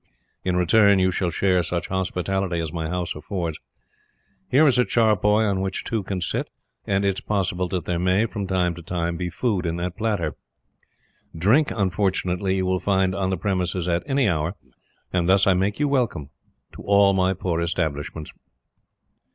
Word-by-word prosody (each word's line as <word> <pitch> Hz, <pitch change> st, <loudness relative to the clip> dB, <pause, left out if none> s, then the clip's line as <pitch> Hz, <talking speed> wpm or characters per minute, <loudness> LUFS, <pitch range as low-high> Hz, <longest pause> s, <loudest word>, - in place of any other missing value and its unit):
In 90 Hz, -1 st, 0 dB
return, 100 Hz, +3 st, +4 dB
you 95 Hz, 0 st, +2 dB
shall 90 Hz, 0 st, -1 dB
share 90 Hz, +1 st, +2 dB
such 85 Hz, 0 st, -3 dB
hospitality 95 Hz, -1 st, -1 dB
as 80 Hz, -2 st, -4 dB
my 80 Hz, -2 st, -3 dB
house 90 Hz, -1 st, -2 dB
affords. 80 Hz, 0 st, -4 dB, 0.9 s
Here 145 Hz, +5 st, +5 dB
is 130 Hz, -4 st, +4 dB
a -, -, +6 dB
charpoy 110 Hz, -2 st, +2 dB
on 95 Hz, -2 st, 0 dB
which 95 Hz, 0 st, -3 dB
two 110 Hz, -2 st, -2 dB
can 95 Hz, -1 st, -4 dB
sit, -, -, -2 dB, 0.4 s
and 100 Hz, 0 st, +1 dB
it 100 Hz, -1 st, +1 dB
is -, -, -15 dB
possible 95 Hz, -3 st, -1 dB
that 90 Hz, 0 st, -3 dB
there 85 Hz, -1 st, -1 dB
may, 90 Hz, +4 st, +2 dB
from 105 Hz, -3 st, -4 dB
time 90 Hz, -2 st, +1 dB
to 85 Hz, -, -10 dB
time, 85 Hz, 0 st, -2 dB
be 90 Hz, +1 st, -3 dB
food 100 Hz, +1 st, -1 dB
in 85 Hz, -, -1 dB
that 90 Hz, +1 st, -3 dB
platter. 105 Hz, -8 st, -1 dB, 1.0 s
Drink, 110 Hz, -, +3 dB
unfortunately, 95 Hz, -1 st, 0 dB
you 95 Hz, -1 st, 0 dB
will 95 Hz, 0 st, +1 dB
find 95 Hz, 0 st, +1 dB
on 95 Hz, -1 st, -1 dB
the 95 Hz, -, -1 dB
premises 90 Hz, -1 st, -1 dB
at 85 Hz, -1 st, +1 dB
any 135 Hz, -3 st, +2 dB
hour: 80 Hz, 0 st, -1 dB, 0.6 s
and 90 Hz, -1 st, +1 dB
thus 95 Hz, +1 st, +5 dB
I 95 Hz, -, +5 dB
make 95 Hz, +5 st, 0 dB
you 150 Hz, -, +2 dB
welcome 120 Hz, -, -1 dB, 0.4 s
to -, -, -10 dB
all 100 Hz, -1 st, +4 dB
my 95 Hz, 0 st, +2 dB
poor 85 Hz, -2 st, -2 dB
establishments." 80 Hz, -2 st, -3 dB
95 Hz, 180 wpm, -23 LUFS, 85-100 Hz, 1.0 s, a